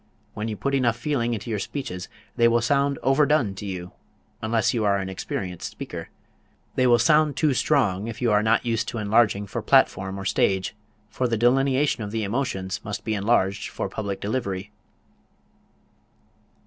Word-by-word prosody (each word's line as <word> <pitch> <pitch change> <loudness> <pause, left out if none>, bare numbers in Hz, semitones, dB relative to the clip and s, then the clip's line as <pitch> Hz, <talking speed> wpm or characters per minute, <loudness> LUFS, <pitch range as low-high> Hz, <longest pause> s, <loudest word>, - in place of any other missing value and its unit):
When 105 +1 -4
you 110 -2 -4
put 140 +8 -2
enough 125 -4 +2
feeling 120 -3 -1
into 115 +2 -6
your 105 - -1
speeches 95 -6 -5 0.3
they 115 -2 +5
will 115 0 +3
sound 140 +2 +2
overdone 135 -5 +3
to 100 +1 -7
you, 90 -2 -5 0.5
unless 110 0 +1
you 115 -3 0
are 100 -1 +3
an 95 -1 -3
experienced 95 -1 -4
speaker. - - -7 0.6
They 130 - +2
will 120 -1 +6
sound 150 0 +3
too 145 0 +3
strong, 115 -8 +1
if 115 - -6
you 120 -3 +1
are 105 0 +4
not 110 +3 +2
used 115 -2 0
to - - -4
enlarging 105 -1 +2
for 100 - -4
platform 95 +1 +2
or 95 - -6
stage, 95 -1 +1 0.4
for 125 - 0
the 115 -1 0
delineation 130 +2 +2
of 105 - -4
the 110 +1 -2
emotions 100 -4 -2
must 100 -1 -5
be 110 - -1
enlarged 100 -1 +1
for - - -4
public 100 -1 -4
delivery. 100 -3 -3
110 Hz, 175 wpm, -24 LUFS, 100-130 Hz, 0.6 s, will